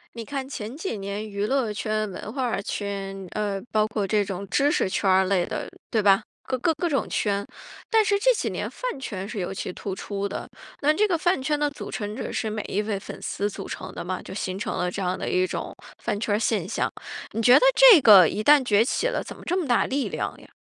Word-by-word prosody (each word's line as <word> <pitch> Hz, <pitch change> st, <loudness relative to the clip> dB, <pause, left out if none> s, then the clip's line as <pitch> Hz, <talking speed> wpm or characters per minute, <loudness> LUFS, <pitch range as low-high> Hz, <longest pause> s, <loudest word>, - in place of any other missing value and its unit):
你 230 Hz, -, -5 dB
看 270 Hz, +2 st, -4 dB
前 230 Hz, -2 st, -6 dB
几 330 Hz, -, -4 dB
年， 200 Hz, +2 st, -5 dB
娱 200 Hz, 0 st, -2 dB
乐 260 Hz, -2 st, +1 dB
圈、 215 Hz, 0 st, -2 dB
文 205 Hz, +3 st, -7 dB
化 250 Hz, -5 st, -1 dB
圈， 195 Hz, -1 st, -4 dB
呃， 205 Hz, -2 st, -2 dB
包 215 Hz, 0 st, +2 dB
括 215 Hz, -2 st, -2 dB
这 210 Hz, +1 st, +2 dB
种 195 Hz, 0 st, -5 dB
知 285 Hz, +8 st, +2 dB
识 -, -, +1 dB
圈 195 Hz, -, 0 dB
儿 190 Hz, 0 st, +5 dB
类 185 Hz, -2 st, +2 dB
的， -, -, -4 dB, 0.2 s
对 220 Hz, -, +1 dB
吧？ 195 Hz, -1 st, +5 dB, 0.2 s
各 260 Hz, -, -2 dB
各 325 Hz, +7 st, +2 dB
各 340 Hz, +3 st, -1 dB
种 280 Hz, -4 st, 0 dB
圈。 200 Hz, -1 st, 0 dB, 0.4 s
但 445 Hz, -1 st, +5 dB
是 405 Hz, -1 st, +2 dB
这 -, -, +4 dB
几 -, -, -1 dB
年 -, -, -3 dB
饭 -, -, -4 dB
圈 200 Hz, -8 st, -5 dB
是 215 Hz, -, -5 dB
尤 180 Hz, 0 st, -3 dB
其 195 Hz, -, -4 dB
突 195 Hz, +1 st, -5 dB
出 200 Hz, +1 st, -4 dB
的。 -, -, -6 dB, 0.3 s
那 295 Hz, +2 st, +4 dB
这 425 Hz, +6 st, +3 dB
个 365 Hz, -4 st, +1 dB
饭 350 Hz, -1 st, +1 dB
圈 295 Hz, +2 st, 0 dB
的 295 Hz, -, +2 dB
组 285 Hz, -, -8 dB
成 210 Hz, -1 st, -4 dB
者 -, -, -4 dB
是 220 Hz, -, -2 dB
每 215 Hz, 0 st, -3 dB
一 200 Hz, -, 0 dB
位 210 Hz, -2 st, -2 dB
粉 195 Hz, -, -9 dB
丝 205 Hz, -, -2 dB
组 -, -, -7 dB
成 185 Hz, 0 st, -7 dB
的 -, -, -5 dB
吗？ 185 Hz, +1 st, -4 dB
就 -, -, -10 dB
形 190 Hz, -1 st, -3 dB
成 210 Hz, -, -3 dB
了 180 Hz, 0 st, 0 dB
这 195 Hz, -, -4 dB
样 180 Hz, 0 st, 0 dB
的 -, -, -3 dB
一 185 Hz, 0 st, +2 dB
种 -, -, -5 dB, 0.3 s
饭 205 Hz, -, -1 dB
圈 210 Hz, -2 st, 0 dB
儿 -, -, +2 dB
现 215 Hz, -6 st, 0 dB
象。 -, -, -1 dB, 0.4 s
你 225 Hz, -, -2 dB
觉 245 Hz, +3 st, +7 dB
得 -, -, +8 dB, 0.2 s
这 -, -, +9 dB
个 200 Hz, -8 st, +9 dB
一 210 Hz, -, -2 dB
旦 290 Hz, +3 st, +6 dB
崛 210 Hz, -3 st, +4 dB
起 -, -, 0 dB
了， -, -, -1 dB
怎 -, -, -9 dB
么 -, -, -14 dB
这 360 Hz, -, 0 dB
么 310 Hz, -, -4 dB
大 240 Hz, -, +3 dB
力 275 Hz, 0 st, -1 dB
量 -, -, -3 dB
呀？ -, -, -16 dB
215 Hz, 270 characters per minute, -25 LUFS, 195-270 Hz, 0.4 s, 这